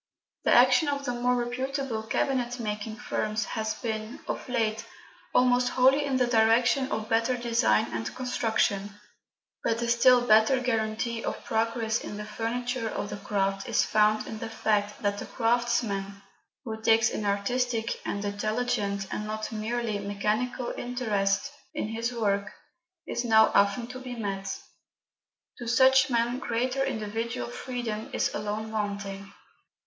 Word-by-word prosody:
The - - +3
action 250 +4 +6
of 280 -1 -1
the 245 - 0
more 245 +1 +1
reputable 250 0 -2
cabinetmaking 225 -3 -2
firms 215 -3 -2
has 220 -1 -2
been, 220 0 -4
of - - -4
late, 225 -2 0 0.5
almost 250 0 +4
wholly 265 +3 +4
in 270 -2 0
the 250 - +3
direction 240 +3 +3
of 220 0 -2
better 230 +3 +1
design 230 - +2
and 115 0 -4
construction; 215 -5 0 0.6
but 230 0 +1
a - - -1
still 245 +1 +5
better 220 +3 +5
guarantee 225 -1 -1
of - - -4
progress 225 0 0
in 205 - -6
the 210 - -5
future 230 +2 -2
of 205 - -4
the 205 - -4
craft 195 +1 -1
is 230 - +3
found 215 0 +3
in 220 - -6
the - - -5
fact 210 -2 -1
that 205 0 0
the - - -6
craftsman 225 -5 0 0.4
who 220 -3 -6
takes 225 0 +4
an - - -3
artistic 225 +3 -1
and 200 0 -3
intelligent, 205 -1 -1
and 210 - -3
not 215 +1 -4
a - - -7
merely 220 0 -2
mechanical 210 +5 -1
interest 220 -1 -1 0.2
in 210 - -2
his 230 +2 -2
work, 205 -3 0 0.5
is 240 - -2
now 220 -2 +5
often 200 +4 +3
to 250 +2 -8
be 255 -1 -7
met. 195 -3 -3 1.0
To 240 - -6
such 260 +2 +5
men 240 +1 +1
greater 255 +2 -1
individual 230 -1 -3
freedom 240 -4 -4
is - - 0
alone 215 +1 -3
wanting. 200 -2 -4
225 Hz, 145 wpm, -28 LUFS, 210-245 Hz, 1.0 s, action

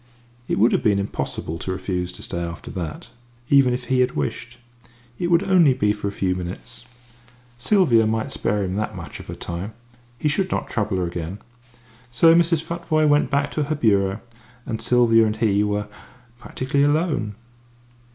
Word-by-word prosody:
It - - -1
would 110 +5 +4
have - - +1
been 105 -2 +3
impossible 90 -4 -3
to 95 - -4
refuse 90 -1 -3
to - - -8
stay 85 - -3
after 85 -2 -6
that 85 +5 -6 0.4
even 135 -3 +6
if 125 +1 -2
he 130 +1 0
had 125 0 +2
wished. 120 0 -4 0.6
It 175 - 0
would 170 +1 +3
only 175 -9 +4
be 105 -5 +2
for 105 -1 -4
a - - -2
few 95 -2 -1
minutes. 90 +6 -7 0.7
Sylvia 125 - +4
might 110 0 -1
spare 105 -1 -1
him 95 +1 -3
that 105 - -3
much - - -8
of - - -11
her - - -6
time. 90 +6 -6 0.4
He 150 - -1
should 185 +6 +1
not - - -2
trouble 105 -3 -1
her 90 - 0
again. 85 +2 -5 0.7
So 165 +7 +5
Mrs. 165 -1 +3
Futvoye 165 -2 0
went 145 0 +3
back 140 0 0
to 150 - -1
her 155 +2 -1
bureau, 100 -5 +1 0.4
and 110 -2 -4
Sylvia 120 -2 +4
and 105 - -1
he 105 -2 +2
were 105 0 -1 0.5
practically 130 +3 -2
alone. 145 - +1
115 Hz, 180 wpm, -22 LUFS, 100-145 Hz, 0.7 s, even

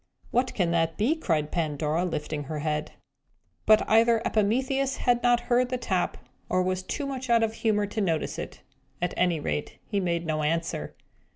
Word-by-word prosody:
"What 250 +1 +1
can 175 -4 +1
that 165 -1 +1
be?" 240 +10 +2
cried 160 - -1
Pandora, 155 0 0
lifting 150 -3 -3
her 155 +2 -4
head. 150 0 -2 0.7
But 215 0 +5
either 225 +1 +5
Epimetheus 260 +6 +1
had 245 -1 +2
not 245 -1 +3
heard 245 +1 +2
the 255 - -1
tap, 190 -7 -1 0.3
or 185 - +2
was 185 0 -1
too 285 +9 -4
much 260 -2 -5
out 230 -1 +4
of 220 -1 0
humour 215 -2 +1
to 215 +2 -3
notice 165 -5 -1
it. - - -7 0.4
At 175 0 -1
any 175 -3 +2
rate, 150 0 -3
he 205 - -1
made 170 -2 -1
no 155 -1 -1
answer. 155 - -2
185 Hz, 180 wpm, -27 LUFS, 165-240 Hz, 0.7 s, But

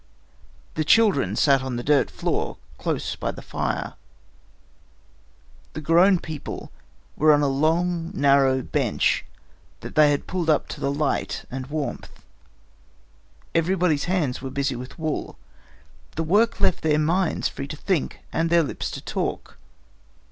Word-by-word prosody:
The 155 - 0
children 155 - +3
sat 135 +1 +4
on 130 -1 -4
the 120 - -3
dirt 140 -2 +3
floor - - -2 0.2
close - - -2
by - - -3
the - - -7
fire. - - -3 1.8
The 155 - -5
grown 175 +5 +5
people 155 -3 -7 0.4
were 155 +1 +5
on 145 0 +4
a - - +3
long 165 +4 +1
narrow 135 -2 +3
bench - - +1 0.6
that - - -8
they 150 -1 +6
had 145 -1 0
pulled 175 -3 -2
up 155 - +2
to - - -7
the 140 - 0
light 145 0 -1
and 130 0 -5
warmth. 150 0 -5 1.3
Everybody's 165 -3 +1
hands 175 -9 -1
were 135 - -5
busy 140 0 -1
with 125 +1 -8
wool. 155 -2 -3 0.8
The 160 - -1
work 215 +8 +2
left - - +2
their 150 -1 +2
minds 165 +4 +1
free 140 - -6
to 150 - -7
think 185 -3 -1
and 165 +1 +1
their 170 0 +4
lips 145 - -4
to - - -8
talk. - - -4
155 Hz, 145 wpm, -24 LUFS, 140-170 Hz, 1.8 s, they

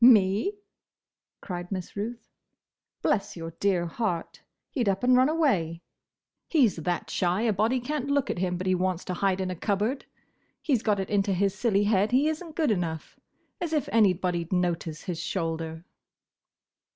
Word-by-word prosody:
"Me!" 220 - +5 0.8
cried 175 -1 -6
Miss 185 -2 -5
Ruth. 225 +4 -5 0.8
"Bless 200 -2 0
your 165 0 -5
dear 190 -4 +2
heart, 175 -1 -3 0.3
he 260 - 0
'd 205 - +2
up 195 +2 -1
and 250 0 +5
run 255 +3 +5
away. 190 - +1 0.6
He 290 -8 +5
's 200 - -4
that 175 +2 -2
shy 180 +4 +1
a 225 -2 +2
body 220 +6 +2
can't 280 +2 -3
look 280 -2 +2
at - - -4
him 180 -1 0
but 185 - -4
he 185 - +3
wants 185 -1 -1
to 180 - -3
hide 190 +1 +1
in 185 -1 -1
a - - -4
cupboard. 210 - -1 0.5
He 295 - -1
's 235 - +3
got 210 -3 +1
it 190 - -3
into 195 -1 +2
his 195 +1 +1
silly 205 -2 +2
head 205 +1 +2
he 270 +4 +4
is 315 +1 -1
n't 320 -3 -11
good 310 -7 +2
enough. 165 -5 -3 0.4
As 335 -2 -2
if 300 -5 +1
anybody'd 180 -5 +2
notice 175 -3 -1
his 175 -3 -4
shoulder!" 165 -2 -3
195 Hz, 180 wpm, -27 LUFS, 180-240 Hz, 0.8 s, Me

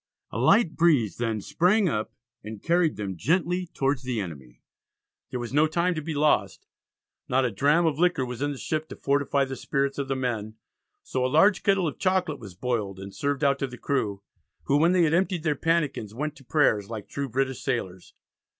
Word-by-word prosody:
A - - -4
light 220 -8 +4
breeze 140 - +3
then 115 -3 -1
sprang 180 - +2
up 110 -9 -2 0.3
and 110 0 -8
carried 170 -2 +2
them 100 -3 -4
gently 180 - 0
towards 135 -4 -1
the 125 -3 -3
enemy. 70 -10 -8 0.7
There 125 - -4
was 120 +1 -6
no 150 +2 +4
time 170 +3 +1
to 155 - -4
be 155 +1 -4
lost; 150 +1 +1 0.6
not 130 +1 +2
a 120 - 0
dram 145 - +3
of 155 -2 0
liquor 175 -6 +2
was 125 0 -6
in 145 0 0
the 140 - -6
ship 155 +3 -3
to - - -7
fortify 140 0 +1
the 135 0 -6
spirits 140 +1 -1
of 140 - -2
the 135 - -1
men, 115 -4 -3 0.5
so 130 - -2
a - - +2
large 190 +9 +4
kettle 195 -3 +2
of 150 - -5
chocolate 185 -6 0
was 100 -6 -11
boiled 105 -3 -2
and 100 0 -8
served 140 +7 -2
out 140 -1 +3
to 135 - -1
the 125 -1 -10
crew, 105 -9 -2 0.4
who 140 - +2
when 165 +4 +4
they 180 -2 +4
had 160 -1 +2
emptied 180 -1 +1
their 155 -3 +2
pannikins, 150 -9 -1
went 150 +3 -3
to 135 - -15
prayers 115 -8 +2
like 110 -3 -6
true 140 -1 -4
British 130 +2 -1
sailors. 95 -9 -4
140 Hz, 205 wpm, -26 LUFS, 115-160 Hz, 0.7 s, light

